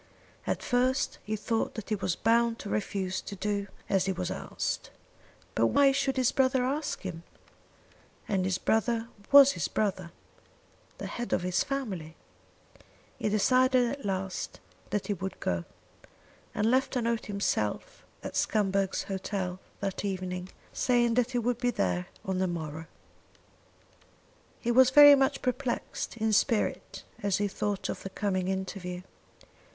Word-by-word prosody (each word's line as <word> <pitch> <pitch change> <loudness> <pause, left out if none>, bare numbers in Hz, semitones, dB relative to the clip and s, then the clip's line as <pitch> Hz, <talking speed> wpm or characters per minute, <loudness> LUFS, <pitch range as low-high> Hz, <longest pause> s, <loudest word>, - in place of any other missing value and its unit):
At - - -1
first 255 +2 +1
he 215 - -2
thought 225 +1 -1
that 220 - -7
he 215 - +1
was 185 -3 -1
bound 230 +1 +2
to 205 - -7
refuse 190 -2 -2
to 200 - -7
do 200 0 -2 0.2
as 195 -1 +1
he - - +2
was 185 -1 -3
asked. - - -3 0.6
But - - +3
why 280 -1 +5
should 270 -1 0
his 255 -2 +3
brother 260 -1 +2
ask 285 +2 -2
him? 175 -3 -6 1.1
And 195 -2 +1
his 185 0 0
brother 225 +3 0 0.2
was 280 -1 +9
his 170 - -2
brother, 185 -5 -1 0.9
the - - -6
head 240 0 -4
of - - +1
his 180 0 +1
family. 195 - -4 1.0
He - - 0
decided 255 +3 +3
at 280 0 -6
last 190 -1 -3 0.3
that 205 - -1
he 210 - 0
would 190 0 -5
go, 85 -1 -1 0.9
and 215 +2 +2
left 260 +1 +2
a 250 - +1
note 230 -1 -1
himself 210 - -2 0.2
at - - -6
Scumberg's 195 -2 +1
Hotel 190 -1 -3 0.2
that 195 -1 -3
evening, 185 -2 -3 0.2
saying 240 -2 +2
that 245 0 +2
he 250 - -2
would 240 0 0
be 245 -1 +1
there 90 - -1 0.2
on 190 -1 -1
the 190 - +2
morrow. 160 -2 -5 1.7
He 240 - 0
was 255 +1 +6
very 290 +2 +10
much 270 -1 +2
perplexed 250 -2 -2
in 220 -1 +1
spirit 225 +1 0 0.2
as 200 -2 +1
he 205 0 +1
thought 200 0 -2
of - - -4
the 195 - -6
coming 190 -2 -1
interview. 190 -1 -4
210 Hz, 150 wpm, -29 LUFS, 190-245 Hz, 1.7 s, very